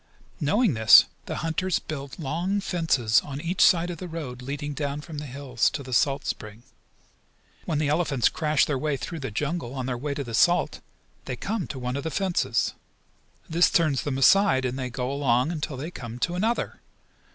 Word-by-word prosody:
Knowing 200 - +2
this 110 -1 +8 0.2
the - - -3
hunters 175 +3 0
build 140 -3 -7
long 170 +7 -1
fences 160 - +2
on 140 -1 -6
each 170 +4 -2
side 175 0 +5
of 170 - -7
the 180 - -6
road 145 -7 -6
leading 145 +3 -4
down 145 0 -3
from 150 0 -7
the 150 - -7
hills 130 -3 0
to 140 0 -5
the 130 -1 -7
salt 140 +3 +2
spring. 110 +2 -5 1.0
When 155 - -1
the 150 -1 0
elephants 150 -5 +2
crash 155 -3 +2
their 140 -3 -1
way 150 0 -1
through 165 +4 -6
the 135 -2 -4
jungle, 140 +3 -3
on 130 -2 -3
their 125 -2 -3
way 140 +2 -3
to 140 - -3
the 120 -3 -8
salt, 175 +9 +3 0.5
they - - -4
come 210 -2 -3
to 135 - -6
one 125 0 -3
of 140 - -3
the 160 - -2
fences. 190 +1 0 0.7
This 170 0 +4
turns 155 -7 +2
them 140 -3 -2
aside, 135 -1 +5
and 130 +1 -2
they 130 -1 -3
go 125 +1 -3
along 135 0 +1
until 150 -4 -4
they 155 +6 -5
come 120 -6 -7
to 175 +8 -1
another. 220 +6 -1
145 Hz, 195 wpm, -26 LUFS, 130-165 Hz, 1.0 s, this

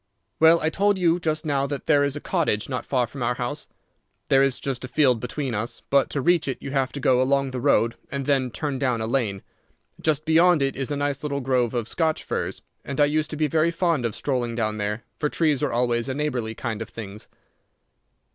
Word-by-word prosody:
"Well, 160 +1 +6
I 160 - +1
told 205 +2 +2
you 175 -1 +2
just 155 -1 -1
now 140 -2 0
that 140 0 -5
there 145 -2 +4
is 140 0 0
a - - -4
cottage 150 - 0
not 125 -3 -4
far 125 -3 +1
from 135 +3 -9
our 120 +1 0
house. 125 +5 -4 0.6
There 135 0 +5
is 135 -2 +2
just 135 -3 -4
a - - -4
field 130 -4 +3
between 125 +2 -3
us, 110 +2 -4
but 140 -1 +4
to 140 - -1
reach 170 0 +2
it 135 - -2
you 140 - -6
have 135 -2 0
to 140 - -4
go 130 -1 +3
along 135 0 +1
the 130 -1 -4
road 115 -4 +3 0.2
and 140 -1 -3
then 135 -3 +1
turn 140 +1 -3
down 125 -4 0
a 110 - -2
lane. 110 -5 -1 0.6
Just 155 -1 +1
beyond 165 -1 +4
it 135 -1 -1
is 135 -1 -2
a 145 - -1
nice 145 -1 -1
little 140 -2 -2
grove 125 -2 0
of 115 -2 -1
Scotch 160 +4 0
firs, - - -4 0.2
and 140 0 -5
I 145 - +6
used 155 +1 0
to 155 - -5
be 155 - +2
very 155 +3 +2
fond 165 -5 0
of 115 -3 -2
strolling 125 -4 -2
down 110 -2 -1
there, 105 +2 -3 0.2
for 150 - 0
trees 150 -5 +1
are - - 0
always 120 +1 0
a 130 - -2
neighbourly 125 -7 -2
kind 115 -3 -4
of 110 - -5
things. 105 -2 -9
135 Hz, 230 wpm, -24 LUFS, 120-150 Hz, 0.6 s, Well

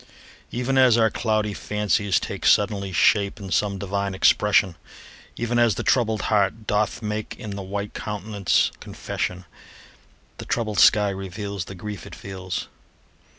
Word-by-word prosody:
Even 125 +2 0
as 125 -3 +6
our 110 -1 +3
cloudy 110 -2 0
fancies 105 -3 0
take - - -6
Suddenly 100 -2 +2
shape 100 +4 +2
in 95 -2 -8
some 100 0 +1
divine 100 0 -2
expression, 95 -1 +3 0.6
Even 120 0 -1
as 115 -4 +4
the - - -3
troubled 110 -4 +1
heart 105 +1 +1
doth 105 +3 0
make 105 0 -4
In 110 -4 -7
the 100 0 -5
white 100 +2 -5
countenance 105 -2 0
confession, 90 0 -5 0.9
The - - -6
troubled 115 -4 -1
sky 105 -1 +5
reveals 95 0 -5
The 95 - -9
grief 100 -2 -7
it - - -10
feels. 95 -2 -5
105 Hz, 145 wpm, -23 LUFS, 95-110 Hz, 0.9 s, as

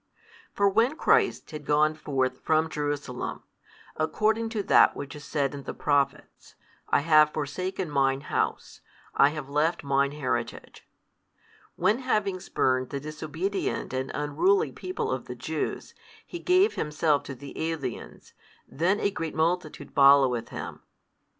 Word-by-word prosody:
For 200 - +2
when 230 +8 +2
Christ - - +2
had 155 -1 -7
gone 150 +2 +3
forth 130 -4 -2
from 160 0 +1
Jerusalem, 145 -4 -4 0.5
according 220 +8 0
to 220 -3 -2
that - - +5
which 140 0 -7
is 150 - -10
said 140 -2 -1
in 140 - -6
the - - -7
Prophets; 145 -2 -1 0.3
I - - +3
have 155 -1 +5
forsaken 180 +5 -3
Mine 135 -2 +1
House, - - -3 0.3
I 140 - +5
have 150 -2 -6
left 150 +4 0
Mine 140 0 +1
heritage; 125 -5 -4 0.9
when 220 - +2
having 210 -7 0
spurned 130 -8 0
the 140 - -4
disobedient 155 +5 -3
and 130 0 -2
unruly 365 - +2
people 435 +5 -4
of - - -3
the - - -7
Jews, - - -4 0.3
He 345 - -7
gave 370 +5 +3
Himself 150 -1 +1
to 135 - -6
the 140 +2 -11
aliens, 140 -7 -6 0.3
then 180 +8 0
a 200 - +1
great 165 -5 -4
multitude 160 -2 -1
followeth 135 -4 +5
Him. - - -7
150 Hz, 140 wpm, -27 LUFS, 140-185 Hz, 0.9 s, that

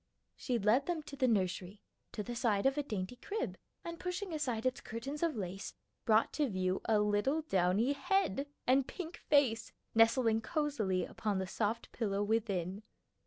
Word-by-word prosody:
She 250 -3 -1
led 225 +6 +3
them 340 -3 -1
to 285 - -9
the 265 -2 +2
nursery; 190 -2 0 0.3
to 210 - -3
the 240 +3 -5
side 225 -3 +1
of 270 0 +4
a 295 - +1
dainty 215 -3 -4
crib; 435 - -3 0.3
and 335 0 -5
pushing 360 0 -3
aside 255 -7 -1
its 255 0 0
curtains 265 +7 -5
of 335 -3 +1
lace, 195 -1 -5 0.3
brought 220 0 +4
to 295 -3 +1
view 185 -1 0
a 220 - +3
little 210 +9 +1
downy 195 - +2
head 290 - +1 0.2
and 260 +1 +4
pink 340 -2 -6
face 245 -6 +2 0.2
nestling 225 0 +4
cosily 220 - 0
upon 210 -3 -2
the 190 - -1
soft 220 +4 -2
pillow 205 -3 -1
within. 205 -3 -1
230 Hz, 165 wpm, -34 LUFS, 205-285 Hz, 0.3 s, of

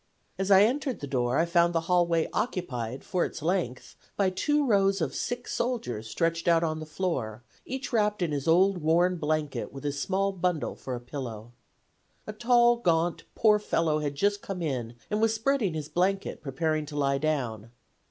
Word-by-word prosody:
As 195 0 -1
I 195 0 +8
entered 260 +3 0
the - - -5
door 125 -1 0
I 165 - +3
found 170 0 +2
the 165 - +2
hallway 170 -1 +2
occupied 130 - -3
for 180 - 0
its 155 - -5
length 165 -8 -2 0.2
by 195 -2 +2
two 295 +10 +1
rows 195 -4 +3
of 160 -5 -1
sick 245 0 -3
soldiers 125 - -3
stretched 165 +5 -1
on 165 -2 +2
the 155 - -7
floor, 130 - -3 0.2
each 265 0 -5
wrapped 210 -3 +1
in 165 - -1
his 140 0 -3
old 185 +3 +4
worn 175 +3 +2
blanket 155 -2 -2
with 135 - -9
his 140 -1 -2
small 195 +1 0
bundle 180 -4 -1
for 130 - -5
a - - -5
pillow. 120 -3 -7 0.7
A 215 - -6
tall, 240 +1 +4
gaunt, 170 -5 0
poor 210 -1 +4
fellow 165 -6 0
had 145 -2 -3
just 205 +6 +1
come 185 -3 -5
in 120 -6 -3 0.2
and 210 +1 0
was 225 0 +3
spreading 225 -6 0
his 150 -2 -4
blanket, 195 +4 -1
preparing 155 +2 -1
to 150 - -8
lie 140 -1 +1
down. 125 -8 -2
170 Hz, 180 wpm, -28 LUFS, 145-195 Hz, 0.7 s, I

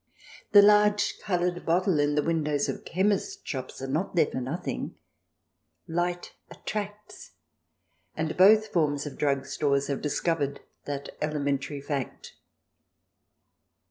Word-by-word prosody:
The 205 -1 +9
large 210 0 +4
coloured 175 -2 -1
bottle 175 -1 +2
in 145 0 +2
the 150 - +2
windows 150 -3 0
of - - -4
chemist's 205 - 0
shops 130 -1 -5
are - - -3
not 155 +8 -2
there 165 -3 +5
for 130 - -4
nothing; 135 +8 -4 0.9
light 175 +1 -2 0.2
attracts, 210 0 -7 0.8
and 160 0 -2
both 215 +3 +6
forms 145 -5 +1
of 145 -3 -6
drug 140 -2 +1
stores 140 0 0
have 140 - -2
discovered 145 -1 -1 0.2
that 140 -1 -5
elementary 145 -1 -1
fact. 140 -2 -5
155 Hz, 120 wpm, -27 LUFS, 140-185 Hz, 0.9 s, The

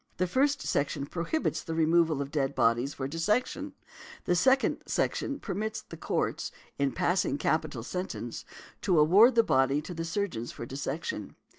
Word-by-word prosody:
The 185 - +2
first 275 +9 +1
section 140 0 -1
prohibits 175 - -2
the 165 -2 -4
removal 160 -2 +3
of 140 - -10
dead 140 -2 -1
bodies 120 +4 +2
for 135 - -3
dissection, 210 - 0
and 295 - -11 0.5
the 180 - +2
second 265 +8 +3
section 280 0 -1
permits 215 +1 -3
the - - -10
Courts, - - -2 0.3
in 140 -1 +2
passing 175 -4 +1
capital 155 -7 -1
sentence, 155 -7 -5 0.4
to 185 -4 +2
award 200 +11 +6
the 230 - +6
body 135 -7 +3
to 180 - -7
the 165 -1 -4
surgeons 165 - -3
for - - -7
dissection. 135 - -4
165 Hz, 160 wpm, -29 LUFS, 140-205 Hz, 0.5 s, award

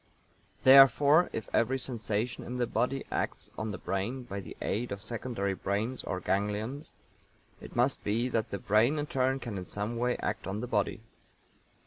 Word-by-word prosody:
Therefore, 140 +4 +7
if 110 - -5
every 130 +3 +2
sensation 115 -2 -2
in 125 - -5
the 125 - +1
body 130 +3 -1
acts - - -3
on 110 - -3
the 100 - -4
brain 105 +9 -3
by 100 -4 -6
the 95 - -9
aid 120 +3 -2
of 100 - -3
secondary 110 -2 -3
brains 105 +7 -2
or 95 - -3
ganglions, 105 - -2 0.6
it - - -11
must 125 +3 +1
be 115 +4 0
that 115 -2 -1
the 100 - -3
brain 110 +9 +3
in 145 - -1
turn 130 -2 +1
can 110 -7 -5
in 90 - -7
some 105 +5 -3
way 125 +1 0
act - - -3
on 100 +2 -3
the 120 - -3
body. 110 -1 -1
115 Hz, 175 wpm, -30 LUFS, 105-130 Hz, 0.6 s, Therefore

